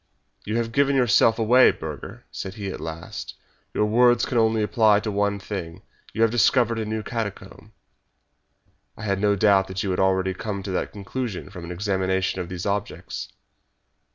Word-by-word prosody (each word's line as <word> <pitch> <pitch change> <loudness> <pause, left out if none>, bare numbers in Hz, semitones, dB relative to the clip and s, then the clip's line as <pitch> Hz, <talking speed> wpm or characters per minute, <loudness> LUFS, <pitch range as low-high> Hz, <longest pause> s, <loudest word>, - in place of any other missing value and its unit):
"You 110 +2 -1
have 115 -1 -1
given 140 +2 +2
yourself 115 -3 +4
away, 120 +3 +6
Burger!" 75 -3 -7
said 95 +1 -6
he 100 -3 -4
at - - -7
last. 80 0 -7 0.4
"Your 105 - +1
words 120 +3 +4
can 120 - 0
only 110 -1 +2
apply 105 -1 +4
to 105 - -3
one 100 0 0
thing. 95 -3 -6 0.3
You 110 - +1
have 115 - +3
discovered 120 -1 +3
a 110 - -2
new 110 0 -3
catacomb." 115 -4 -6 1.3
"I - - -9
had 100 -2 0
no 105 -1 +3
doubt 100 -1 +4
that 95 0 -3
you 100 - -1
had 90 - -1
already 95 0 +2
come 100 0 -5
to 95 - -4
that 90 - -2
conclusion 105 +1 -5
from 90 -2 -8
an 85 - -7
examination 95 0 -1
of 90 - -7
these 90 -1 -5
objects." 100 0 -4
105 Hz, 180 wpm, -24 LUFS, 95-115 Hz, 1.3 s, away